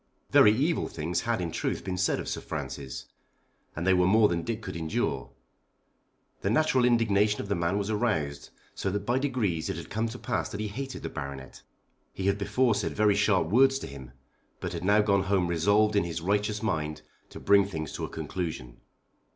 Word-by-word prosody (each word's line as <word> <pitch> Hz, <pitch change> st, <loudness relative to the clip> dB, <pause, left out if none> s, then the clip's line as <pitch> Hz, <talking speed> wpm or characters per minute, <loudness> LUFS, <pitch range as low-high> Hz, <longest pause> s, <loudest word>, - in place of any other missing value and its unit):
Very 105 Hz, -, +7 dB
evil 145 Hz, +10 st, +1 dB
things 85 Hz, +2 st, -2 dB
had 115 Hz, -, +1 dB
in 85 Hz, -2 st, -3 dB
truth -, -, -2 dB
been 95 Hz, -1 st, -3 dB
said 90 Hz, -, +1 dB
of -, -, -5 dB
Sir -, -, -3 dB
Francis, 65 Hz, -2 st, -6 dB, 0.7 s
and 85 Hz, -, -3 dB
they 95 Hz, -, +5 dB
were 90 Hz, 0 st, +3 dB
more 105 Hz, +2 st, +5 dB
than 85 Hz, -1 st, -1 dB
Dick 115 Hz, +4 st, -4 dB
could -, -, -6 dB
endure. 80 Hz, -2 st, -2 dB, 1.1 s
The 100 Hz, -, 0 dB
natural 130 Hz, +1 st, +3 dB
indignation 105 Hz, -3 st, +3 dB
of 100 Hz, -, -5 dB
the -, -, +2 dB
man 85 Hz, +2 st, 0 dB
was 100 Hz, +1 st, -2 dB
aroused, 80 Hz, -11 st, -1 dB, 0.2 s
so 95 Hz, -, -2 dB
that 100 Hz, +1 st, -3 dB
by 120 Hz, +3 st, +1 dB
degrees 105 Hz, -, -1 dB
it 95 Hz, -, -2 dB
had 85 Hz, -, -9 dB
come 110 Hz, +2 st, 0 dB
to 120 Hz, -, -7 dB
pass 120 Hz, -3 st, -2 dB
that 100 Hz, -, -6 dB
he 105 Hz, -1 st, -2 dB
hated 135 Hz, +5 st, -6 dB
the -, -, -3 dB
Baronet. 70 Hz, -1 st, -7 dB, 0.5 s
He 95 Hz, -, -4 dB
had 100 Hz, +1 st, +1 dB
before 120 Hz, +4 st, +2 dB
said -, -, -2 dB
very 105 Hz, -1 st, +4 dB
sharp 100 Hz, -5 st, +2 dB
words 135 Hz, +5 st, +5 dB
to -, -, -6 dB
him, 65 Hz, -2 st, -10 dB, 0.5 s
but -, -, -4 dB
had -, -, -5 dB
now 100 Hz, +3 st, +4 dB
gone 100 Hz, -2 st, +3 dB
home 95 Hz, -2 st, +2 dB
resolved 100 Hz, +6 st, +2 dB
in 100 Hz, -, +3 dB
his 85 Hz, -1 st, -4 dB
righteous 105 Hz, +4 st, -1 dB
mind 75 Hz, -7 st, -2 dB, 0.3 s
to -, -, -10 dB
bring 100 Hz, -1 st, +5 dB
things 80 Hz, -6 st, -5 dB
to -, -, -5 dB
a -, -, -3 dB
conclusion. 75 Hz, -9 st, -5 dB
100 Hz, 205 wpm, -28 LUFS, 85-110 Hz, 1.1 s, Very